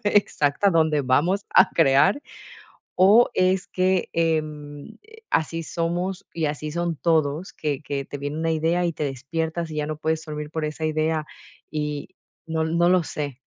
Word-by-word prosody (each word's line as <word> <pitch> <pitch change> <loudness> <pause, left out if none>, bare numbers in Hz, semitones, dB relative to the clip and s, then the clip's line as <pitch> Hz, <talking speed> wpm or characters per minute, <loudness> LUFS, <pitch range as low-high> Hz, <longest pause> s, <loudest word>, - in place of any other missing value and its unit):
exacta 200 -3 +2
donde 160 -3 +3
vamos 170 +11 +2
a - - +7
crear. 165 - +4 0.8
O 205 +6 +6
es 185 0 +2
que, 185 0 +1
em, 155 -3 -2 0.3
así 165 +1 0
somos 175 +4 -2
y 160 -2 -1
así 150 +1 -3
son 170 0 -1
todos, 160 +1 0
que 145 -2 -3
que 140 -1 -3
te 145 - -7
viene 145 +2 -4
una 165 0 0
idea 165 +3 +1
y 170 - -1
te 155 - -4
despiertas, 160 +5 -3
y - - -6
ya 150 - 0
no 155 - -4
puedes 160 +1 -1
dormir 150 -1 -5
por 160 -2 -2
esa 155 +1 -4
idea, 155 0 0 0.5
y 150 -1 -3 0.4
no 160 0 -1
no 170 +2 +2
lo 180 -1 +4
sé. 145 -4 -5
160 Hz, 165 wpm, -24 LUFS, 150-170 Hz, 0.8 s, a